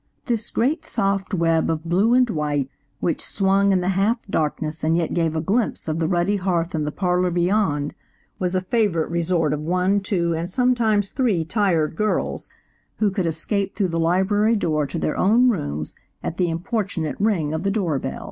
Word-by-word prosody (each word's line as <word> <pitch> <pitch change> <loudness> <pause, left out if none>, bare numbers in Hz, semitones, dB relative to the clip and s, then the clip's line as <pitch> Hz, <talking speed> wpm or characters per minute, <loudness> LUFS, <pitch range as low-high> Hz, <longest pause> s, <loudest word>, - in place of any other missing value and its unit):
This 235 -5 -2
great 290 +7 0
soft 195 -5 -1
web 165 -3 +2
of 160 -1 -1
blue 195 +8 +3
and 250 -1 +4
white 150 - -1 0.3
which 170 - 0
swung 195 0 +2
in 185 -2 +2
the 180 - 0
half 195 +5 +2
darkness 155 -2 -2
and 160 +1 +2
yet 170 -2 -1
gave 165 -2 0
a 160 - 0
glimpse 210 +4 -1
of 155 +1 -1
the 160 - +1
ruddy 180 +4 +1
hearth 180 -2 -1
in 155 -2 -1
the 150 - -2
parlor 180 +1 +1
beyond, 175 -4 +1 0.5
was 180 0 -1
a 185 - +1
favorite 185 -6 0
resort 170 -3 +1
of 150 0 -3
one, 180 +4 +1
two 180 -4 0
and 165 +2 -3
sometimes 220 -3 +1
three 215 - +1
tired 170 -5 +1
girls, 215 +4 -1 0.5
who 210 -2 +2
could 190 -3 -1
escape 195 +5 -2
through 195 -4 0
the 165 0 -1
library 190 +6 +2
door 155 -7 0
to 140 - -5
their 155 - -1
own 235 +6 +4
rooms 75 - -3 0.3
at 165 - -4
the 180 -2 +1
importunate 180 -2 -2
ring 175 -9 +1
of 160 - -2
the 195 - 0
door 180 -9 0
bell. - - -5
180 Hz, 190 wpm, -22 LUFS, 165-205 Hz, 0.5 s, and